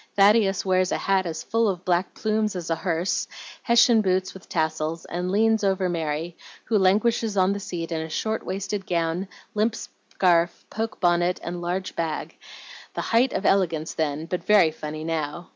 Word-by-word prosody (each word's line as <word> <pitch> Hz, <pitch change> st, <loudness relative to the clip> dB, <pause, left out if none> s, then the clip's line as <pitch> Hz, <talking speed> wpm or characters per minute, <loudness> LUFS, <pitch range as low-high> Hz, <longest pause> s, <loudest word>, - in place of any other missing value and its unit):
Thaddeus 200 Hz, -1 st, +4 dB
wears 185 Hz, -1 st, +2 dB
a -, -, +1 dB
hat 190 Hz, -2 st, +1 dB
as 160 Hz, -1 st, -5 dB
full 225 Hz, +4 st, +1 dB
of 180 Hz, -2 st, -4 dB
black 180 Hz, +1 st, 0 dB
plumes 215 Hz, -1 st, 0 dB
as 170 Hz, -2 st, -4 dB
a -, -, +3 dB
hearse, 170 Hz, +1 st, -1 dB, 0.3 s
Hessian 235 Hz, -1 st, +5 dB
boots 185 Hz, -1 st, 0 dB
with 190 Hz, -, -14 dB
tassels, 160 Hz, 0 st, -1 dB
and 180 Hz, +1 st, -3 dB
leans 220 Hz, +2 st, +2 dB
over 190 Hz, -2 st, +1 dB
Mary, 165 Hz, 0 st, -3 dB, 0.3 s
who 215 Hz, -2 st, +2 dB
languishes 210 Hz, +3 st, +2 dB
on 190 Hz, +1 st, +3 dB
the 200 Hz, -, -4 dB
seat 170 Hz, -3 st, -5 dB
in 160 Hz, -1 st, -1 dB
a 160 Hz, -, -6 dB
short 220 Hz, +7 st, -2 dB
waisted 195 Hz, +1 st, -4 dB
gown, 170 Hz, +2 st, -1 dB, 0.3 s
limp 215 Hz, +2 st, +1 dB
scarf, 175 Hz, -2 st, 0 dB
poke 225 Hz, +1 st, -4 dB
bonnet, 175 Hz, 0 st, +2 dB
and 175 Hz, 0 st, -5 dB
large 180 Hz, +2 st, -3 dB
bag, 165 Hz, -2 st, -3 dB, 0.6 s
the -, -, -1 dB
height 245 Hz, +3 st, +2 dB
of 190 Hz, -, -3 dB
elegance 165 Hz, -5 st, +1 dB
then, 155 Hz, 0 st, -2 dB
but 180 Hz, +1 st, -4 dB
very 195 Hz, -7 st, +5 dB
funny 155 Hz, 0 st, -6 dB
now. 160 Hz, +1 st, -3 dB
185 Hz, 175 wpm, -24 LUFS, 165-200 Hz, 0.6 s, Hessian